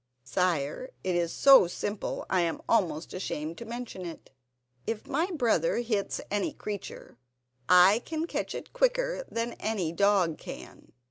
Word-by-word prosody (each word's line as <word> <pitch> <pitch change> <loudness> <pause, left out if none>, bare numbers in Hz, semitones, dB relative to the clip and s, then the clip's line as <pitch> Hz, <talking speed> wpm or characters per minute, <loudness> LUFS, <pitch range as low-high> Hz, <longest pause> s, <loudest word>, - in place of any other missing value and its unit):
"Sire, 165 - -1
it 185 -1 0
is 170 -1 0
so 270 -9 +7
simple 205 +4 -4
I 185 - +2
am 165 -1 -2
almost 165 -8 +1
ashamed 165 -3 -4
to 235 - -7
mention 235 -4 -6
it. 170 -2 -9 0.6
If 225 -1 -3
my 320 +6 0
brother 235 - +1
hits 225 -4 -1
any 205 -1 0
creature 205 - -7 0.5
I 180 +4 +7
catch 320 +6 -3
it - - -8
quicker - - +1
than 230 +1 -2
any 195 -7 -1
dog 185 -3 +2
can. - - -10
200 Hz, 140 wpm, -29 LUFS, 170-240 Hz, 0.6 s, so